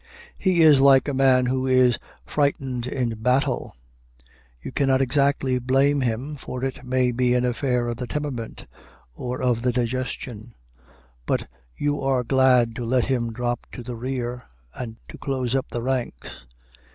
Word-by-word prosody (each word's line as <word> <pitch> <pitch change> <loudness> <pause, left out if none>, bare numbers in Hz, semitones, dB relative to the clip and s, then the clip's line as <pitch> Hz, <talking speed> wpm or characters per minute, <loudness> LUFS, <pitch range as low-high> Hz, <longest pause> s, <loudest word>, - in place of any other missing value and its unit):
He 185 -3 +2
is 150 -4 +7
like 135 -1 +6
a 145 - -1
man 130 -1 +4
who 130 +1 0
is 130 -2 +4 0.3
frightened 135 -4 -1
in 120 -4 -2
battle: 125 - 0 0.8
you - - -7
cannot 135 -2 +2
exactly 135 -1 +1
blame 135 +3 +2
him, 130 +5 -2
for 130 -1 -6
it 135 +1 -3
may 125 0 +1
be 125 0 +2
an 125 0 +2
affair 125 0 0
of 120 -1 -3
the 125 0 -5
temperament 140 -6 -4 0.5
or 125 - -5
of 120 -2 +1
the 125 +1 +1
digestion; 120 -2 -3 0.7
but - - 0 0.3
you 145 0 -1
are 135 -2 +1
glad 125 -2 +3
to 120 - -3
let 125 +1 +1
him 120 -3 -1
drop 120 +1 -3
to 125 - -7
the 120 0 -6
rear, 125 0 -4 0.3
and 115 -3 -6
to - - -11
close 130 -3 -2
up 135 -1 0
the 120 - -4
ranks. 120 - -4
125 Hz, 160 wpm, -24 LUFS, 120-135 Hz, 0.8 s, is